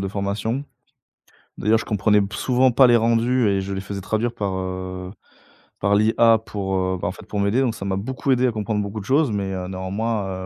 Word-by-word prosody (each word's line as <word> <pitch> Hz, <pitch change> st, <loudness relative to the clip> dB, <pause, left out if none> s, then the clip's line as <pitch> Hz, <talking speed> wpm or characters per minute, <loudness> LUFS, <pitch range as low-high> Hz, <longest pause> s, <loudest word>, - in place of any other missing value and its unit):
de 95 Hz, -, -2 dB
formation. 105 Hz, +7 st, -2 dB, 0.9 s
D'ailleurs, 110 Hz, +2 st, +3 dB
je -, -, -6 dB
comprenais 105 Hz, 0 st, +2 dB
p 100 Hz, -, -1 dB
souvent 130 Hz, 0 st, +2 dB
pas 130 Hz, +1 st, +6 dB
les 120 Hz, -1 st, +6 dB
rendus 115 Hz, +1 st, +2 dB
et 95 Hz, -1 st, +1 dB
je 100 Hz, +1 st, -5 dB
les 95 Hz, -, -3 dB
faisais 100 Hz, 0 st, -6 dB
traduire 110 Hz, +4 st, -1 dB
par, 100 Hz, -2 st, -3 dB
heu, 95 Hz, 0 st, -5 dB, 0.7 s
par 100 Hz, +1 st, +2 dB
l'IA 115 Hz, +2 st, +4 dB
pour, 100 Hz, -3 st, -4 dB
heu, 95 Hz, 0 st, 0 dB
bah -, -, -1 dB
en -, -, -1 dB
fait -, -, -12 dB
pour 105 Hz, -, -4 dB
m'aider. 100 Hz, +6 st, +2 dB
Donc, 120 Hz, -4 st, 0 dB
ça 100 Hz, -, -7 dB
m'a 95 Hz, -1 st, -1 dB
beaucoup 130 Hz, +5 st, -2 dB
aidé 130 Hz, 0 st, +3 dB
à -, -, +1 dB
comprendre 105 Hz, -1 st, -2 dB
beaucoup 100 Hz, +2 st, -5 dB
de 95 Hz, -, -11 dB
choses, 140 Hz, -1 st, +2 dB
mais, 100 Hz, -2 st, -2 dB
heu, 90 Hz, -1 st, -4 dB
néanmoins, 95 Hz, 0 st, -3 dB
105 Hz, 225 wpm, -22 LUFS, 95-115 Hz, 0.9 s, pas